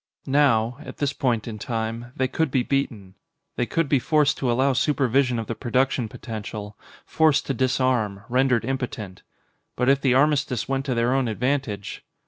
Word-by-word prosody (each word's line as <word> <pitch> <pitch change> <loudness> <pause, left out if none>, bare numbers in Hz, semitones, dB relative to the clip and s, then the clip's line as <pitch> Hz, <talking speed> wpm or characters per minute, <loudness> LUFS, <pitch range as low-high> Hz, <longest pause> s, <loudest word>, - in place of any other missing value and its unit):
Now 130 -4 +2
at 155 - -10
this 140 -1 -1
point 120 -6 -1
in 110 -2 -6
time 115 +2 -4
they 130 - +1
could 160 +4 0
be 130 -1 +1
beaten. 115 -9 -2 0.4
They 120 - -1
could 165 +6 0
be 140 -1 +3
forced 150 +2 +2
to 125 -3 +1
allow 130 +3 +2
supervision 130 -2 +2
of 115 - -3
the 115 - -3
production 125 0 0
potential, 105 -2 -7 0.3
forced 155 -3 +2
to 135 - -1
disarm, 125 -5 0
rendered 125 -2 +2
impotent. 120 -7 -4 0.5
But 125 +1 +1
if 140 0 +3
the 130 -2 +3
armistice 140 -4 +2
went 135 0 -1
to 130 -3 -1
their 120 +2 +2
own 135 -2 +1
advantage 115 -3 -2
130 Hz, 170 wpm, -24 LUFS, 115-135 Hz, 0.5 s, be